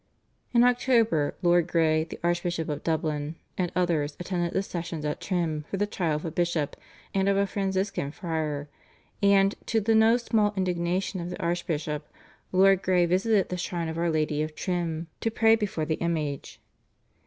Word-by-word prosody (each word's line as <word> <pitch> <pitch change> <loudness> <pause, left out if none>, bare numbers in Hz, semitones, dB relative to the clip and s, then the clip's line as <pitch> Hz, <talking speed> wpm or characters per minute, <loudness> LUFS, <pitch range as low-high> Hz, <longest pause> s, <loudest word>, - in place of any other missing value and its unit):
In 240 -1 +5
October 235 - +3
Lord 175 -1 +4
Grey, 160 -2 +2
the - - -9
Archbishop 175 -1 -1
of 145 -1 -3
Dublin, 155 -1 -1 0.2
and 180 -2 -1
others 160 -5 0
attended 175 -1 -2
the 195 - 0
sessions 165 -4 -5
at 150 - -3
Trim 165 -5 -1
for 195 - -2
the 205 - +1
trial 175 -6 -1
of 150 - -4
a 165 - -3
bishop 170 -3 -1 0.4
and 195 0 +2
of 200 - +2
a 200 - +3
Franciscan 195 -5 -1
friar, 155 -3 -3 0.5
and, 200 0 +5
to 225 - +2
the 220 +2 +2
no 220 +2 +5
small 215 -3 +1
indignation 180 +1 -1
of 170 0 -4
the 180 - -6
archbishop, 160 -3 -2 0.4
Lord 190 0 +5
Grey 180 -2 +3
visited 190 +3 +2
the 180 - -3
shrine 170 -2 -3
of 160 - -5
Our 170 0 +1
Lady 155 -1 0
of 155 0 -3
Trim 170 -3 -2
to 225 - 0
pray 225 0 +4
before 200 -8 -2
the 155 +1 -2
image. 155 -4 -2
175 Hz, 175 wpm, -27 LUFS, 160-195 Hz, 0.5 s, In